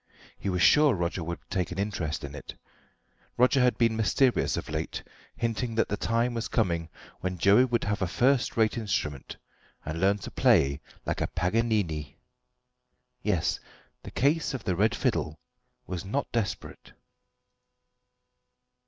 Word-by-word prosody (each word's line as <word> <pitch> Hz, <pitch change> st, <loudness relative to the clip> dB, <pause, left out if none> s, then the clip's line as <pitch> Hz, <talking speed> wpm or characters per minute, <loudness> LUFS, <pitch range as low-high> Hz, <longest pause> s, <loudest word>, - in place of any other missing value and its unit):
He 100 Hz, -, -4 dB
was 90 Hz, -1 st, +1 dB
sure 150 Hz, -3 st, +6 dB
Roger 85 Hz, 0 st, -2 dB
would 85 Hz, +1 st, -4 dB
take 90 Hz, -2 st, -2 dB
an 90 Hz, -, -5 dB
interest 90 Hz, -6 st, -2 dB
in 70 Hz, -1 st, -6 dB
it. 75 Hz, -, -8 dB, 0.8 s
Roger 125 Hz, +2 st, +4 dB
had 125 Hz, 0 st, +3 dB
been 115 Hz, -2 st, +3 dB
mysterious 120 Hz, +4 st, +2 dB
of -, -, -4 dB
late, 80 Hz, +1 st, -4 dB, 0.3 s
hinting 115 Hz, 0 st, -2 dB
that 115 Hz, -, +1 dB
the 105 Hz, -, 0 dB
time 115 Hz, +3 st, 0 dB
was 115 Hz, -1 st, -2 dB
coming 85 Hz, -7 st, 0 dB, 0.3 s
when 90 Hz, 0 st, -3 dB
Joey 100 Hz, +8 st, +5 dB
would 120 Hz, -2 st, 0 dB
have 105 Hz, 0 st, -1 dB
a 95 Hz, -, +1 dB
first 125 Hz, +9 st, +2 dB
rate 110 Hz, +1 st, +2 dB
instrument 95 Hz, -, -3 dB, 0.5 s
and 80 Hz, +2 st, -4 dB
learn 100 Hz, +2 st, +3 dB
to 100 Hz, -, -8 dB
play 70 Hz, +1 st, +3 dB, 0.2 s
like -, -, -2 dB
a -, -, +1 dB
Paganini. 90 Hz, -7 st, -1 dB, 1.0 s
Yes; -, -, 0 dB, 0.4 s
the -, -, -9 dB
case 145 Hz, +1 st, +1 dB
of 125 Hz, -, -6 dB
the 90 Hz, -, 0 dB
red 105 Hz, +5 st, +2 dB
fiddle 75 Hz, -, -1 dB, 0.5 s
was 90 Hz, -3 st, -5 dB
not 135 Hz, +9 st, -2 dB
desperate. 115 Hz, -5 st, -4 dB
100 Hz, 150 wpm, -28 LUFS, 85-115 Hz, 1.0 s, sure